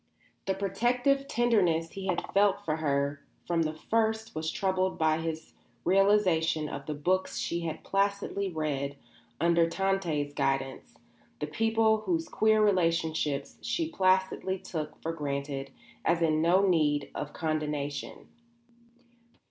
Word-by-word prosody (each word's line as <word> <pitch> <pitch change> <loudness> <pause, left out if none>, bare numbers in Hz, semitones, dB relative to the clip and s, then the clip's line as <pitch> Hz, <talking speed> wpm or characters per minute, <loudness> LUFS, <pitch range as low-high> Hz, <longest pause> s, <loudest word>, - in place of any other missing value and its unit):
The 190 - +1
protective 245 +8 +1
tenderness 185 -11 +2
he 195 -1 -6
had 180 -2 -1
felt 200 0 +3
for 155 0 0
her 140 -2 0 0.2
from 170 -1 +1
the 155 -1 -1
first 220 +4 0
was 160 0 -2
troubled 185 +1 0
by 160 0 +2
his 160 -1 -5 0.3
realisation 180 -5 +3
of 140 -1 -7
the 150 - -2
books 185 +6 0
she 170 - -1
had 165 -2 -5
placidly 200 0 0
read 140 -3 -2 0.4
under 170 0 +3
Tante's 170 -7 -1
guidance 135 -1 -2 0.4
the - - -1
people 225 +6 +2
whose 175 -6 -1
queer 220 0 +3
relationships 165 -7 0
she 315 +7 -1
placidly 190 - +1
took 155 -4 -6
for 165 - -2
granted 140 -2 -3 0.3
as 170 0 +2
in 155 -1 +2
no 185 +4 +4
need 150 -5 +2
of 150 - -5
condonation. 150 -3 -3
170 Hz, 130 wpm, -29 LUFS, 155-195 Hz, 0.4 s, no